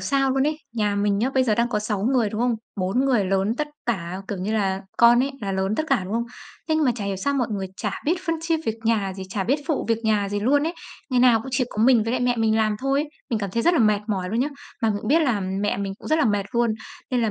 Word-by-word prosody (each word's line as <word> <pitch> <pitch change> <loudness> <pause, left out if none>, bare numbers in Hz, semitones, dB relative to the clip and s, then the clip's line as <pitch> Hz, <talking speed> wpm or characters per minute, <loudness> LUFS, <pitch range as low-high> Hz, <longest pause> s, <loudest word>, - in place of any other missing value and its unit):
sao 270 +8 +1
luôn 265 +1 +2
ấy, 305 0 0 0.2
nhà 210 -3 0
mình 200 0 +1
nhá, 250 +5 +1
bây 260 - +4
giờ 220 -4 +2
đang 235 +2 +1
có 210 - 0
6 210 -2 -2
người, 240 -1 +2
đúng 215 - -3
không? 245 0 +2 0.2
4 195 +7 0
người 250 -7 +2
lớn 195 +3 +1
tất 300 0 -1 0.2
cả, 185 -6 -2
kiểu 200 -3 -3
như 200 +4 -2
là, 195 -3 0 0.2
con 235 +1 +6
ấy 275 - -1
là 200 -2 -3
lớn 190 +2 0
tất - - +1
cả, 270 -4 +3
đúng 195 - -6
không? 235 +1 0 0.4
Thế 315 - +2
nhưng 315 -1 +2
mà 250 - +3
chả 210 -4 -5
hiểu 195 -1 -2
sao 280 +9 -1
mọi 250 -4 0
người 195 -2 -2
chả - - -2
biết 320 - +2
phân 330 - +1
chia 330 0 +1
việc 225 - 0
nhà 215 -4 +1
gì, 190 - -6
chả 195 -1 -2
biết 270 +5 +2
phụ 310 -4 0
việc 230 -1 +2
nhà 210 -2 +2
gì 205 0 -2
luôn 280 +7 +3
ấy. 330 - -1 0.4
Ngày 250 -1 +3
nào 245 -2 +6
cũng 235 - -8
chỉ 255 0 +1
có 215 - -1
mình 240 -2 +5
với 225 - -1
lại 255 - 0
mẹ 245 -1 +1
mình 220 -1 +2
làm 215 -1 +1
thôi 275 +1 +1
ấy. 300 - -4 0.2
Mình 230 - +1
cảm 200 -2 -3
thấy 230 +4 -1
rất 345 +6 +4
là - - +3
mệt 215 -2 +3
mỏi 190 -3 -1
luôn 230 +3 0
nhá. 280 - +1 0.3
Mà 225 - +3
mình 205 - -1
cũng 215 - -6
biết 320 +4 +4
là 240 -9 +1
mẹ 195 +2 -1
mình 200 -1 -3
cũng - - -9
rất 315 - +3
là 315 - +3
mệt 205 -3 +1
luôn, 235 -2 +2 0.4
nên 250 -2 +1
là 225 - +1
225 Hz, 310 wpm, -23 LUFS, 200-255 Hz, 0.4 s, con